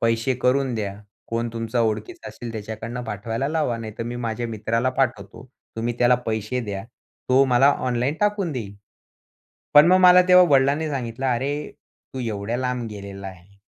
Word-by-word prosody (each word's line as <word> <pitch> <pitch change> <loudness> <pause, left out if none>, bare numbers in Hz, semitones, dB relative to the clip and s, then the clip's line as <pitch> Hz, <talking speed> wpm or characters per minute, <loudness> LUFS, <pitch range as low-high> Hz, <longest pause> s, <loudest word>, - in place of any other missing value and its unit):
पैसे 115 +3 +1
करून 130 -1 +2
द्या. 100 -3 -3 0.3
कोण 115 +1 -2
तुमचा 115 +1 -2
ओळखीचं 115 - -2
असेल 120 -2 -8
त्याच्याकडनं 110 +3 -6
पाठवायला 115 +5 -3
लावा 150 -7 0
नाहीतर 110 0 -6
मी 120 +1 -5
माझ्या 115 +1 -2
मित्राला 115 +3 -1
पाठवतो, 120 -4 -2 0.3
तुम्ही 115 +1 -2
त्याला 125 0 +5
पैसे 110 +3 -2
द्या 100 -2 -5 0.4
तो 130 +2 +5
मला 135 +3 +6 0.2
ऑनलाईन 125 +4 0
टाकून 205 -5 0
देईल." 105 -7 -6 1.0
पण 145 +2 +9
मग 185 +1 +6
मला 180 0 +8
तेव्हा 180 0 +7
वडिलांनी 140 +4 +2
सांगितलं, 130 -2 -4
"अरे 130 +3 0 0.6
तू 130 - -5
एवढ्या 110 -1 -3
लांब 125 -2 -2
गेलेला 100 -1 -8
आहे 95 +1 -14
120 Hz, 155 wpm, -23 LUFS, 110-135 Hz, 1.0 s, पण